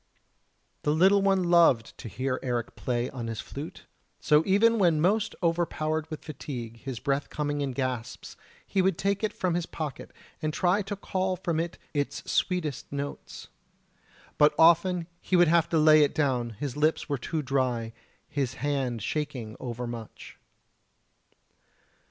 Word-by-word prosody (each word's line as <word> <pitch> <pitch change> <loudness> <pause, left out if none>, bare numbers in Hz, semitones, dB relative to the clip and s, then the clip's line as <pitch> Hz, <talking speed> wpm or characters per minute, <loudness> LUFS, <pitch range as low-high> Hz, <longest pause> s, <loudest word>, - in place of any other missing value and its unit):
The 150 - +1
little 195 +4 +5
one 195 -1 +3
loved 170 -10 +4
to - - -7
hear 130 +3 -2
Eric 120 -2 -3
play 120 -1 -2
on 120 -4 -5
his 115 -2 -4
flute; 145 +4 -8 0.3
so 150 -1 +4
even 225 +4 +4
when 170 -5 +4
most 205 +6 +1
overpowered 160 -2 0
with 155 - -7
fatigue, 125 -6 -6
his 130 0 -6
breath 140 +3 -1
coming 145 -1 -2
in 140 -1 -1
gasps, 130 -3 -4 0.3
he 195 - +1
would 185 -2 +1
take 200 +1 0
it 215 - +1
from 185 -2 -1
his 175 0 -1
pocket 150 -4 -6 0.3
and 155 - -1
try 185 +3 +2
to 205 +1 -4
call 185 -1 -1
from 170 -3 -2
it 170 0 -3 0.2
its 145 -2 -2
sweetest 165 -8 -1
notes. 140 0 -6 0.9
But 150 0 +5
often 170 +1 +5
he 185 - -1
would 175 -2 +6
have 170 -1 +3
to 165 - +1
lay 155 0 +7
it 145 - +2
down, 125 -6 0
his 140 -4 -3
lips 155 +2 +1
were 140 -3 -2
too 155 +5 -3
dry, 125 -4 -1 0.3
his 140 -4 -2
hand 130 -5 -2
shaking 135 -8 -3
overmuch. 120 -2 -7
150 Hz, 155 wpm, -28 LUFS, 130-175 Hz, 0.9 s, lay